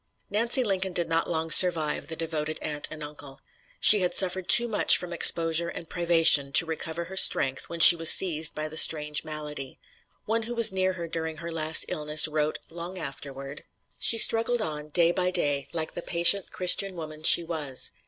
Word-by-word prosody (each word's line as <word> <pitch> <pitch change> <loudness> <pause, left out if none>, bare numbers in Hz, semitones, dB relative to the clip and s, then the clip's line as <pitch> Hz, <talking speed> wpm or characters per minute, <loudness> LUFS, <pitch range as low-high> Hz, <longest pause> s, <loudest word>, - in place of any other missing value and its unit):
Nancy 235 +5 -1
Lincoln 190 -3 -4
did 170 -1 -4
not 165 0 -4
long 165 -1 -5
survive 165 -5 +2
the 160 - -8
devoted 155 -1 -7
aunt 150 -1 -5
and 155 -1 -10
uncle. 145 -2 -9 0.4
She 210 - +7
had 180 -2 -3
suffered 185 -1 -1
too 240 0 +5
much 215 -3 +4
from 175 -1 -9
exposure 165 0 +3
and 165 - -12
privation 165 -5 +1
to 165 - +5
recover 160 +1 -8
her 190 +3 -13
strength 135 -7 +1
when 170 - -10
she 170 - +11
was 165 -1 +3
seized 160 -4 +3
by 155 0 -6
the 155 +1 -9
strange 150 -2 +3
malady. 150 -3 -9 0.5
One 225 +1 -3
who 235 +2 -9
was 230 -3 +4
near 190 0 -3
her 170 -2 -9
during 160 -1 -6
her 170 +1 -10
last 160 0 +2
illness 150 0 +2
wrote, 155 0 -4
long 170 +2 -10
afterward: 140 -2 -11 0.4
"She 230 - 0
struggled 230 +2 -1
on, 150 -6 -7
day 170 +2 -1
by 180 0 -3
day, 145 -6 -4
like 160 -2 -6
the - - -9
patient 175 +3 +1
Christian 185 +1 -2
woman 155 -2 -12
she 170 - +4
was. 155 -6 -5
165 Hz, 190 wpm, -23 LUFS, 155-180 Hz, 0.5 s, she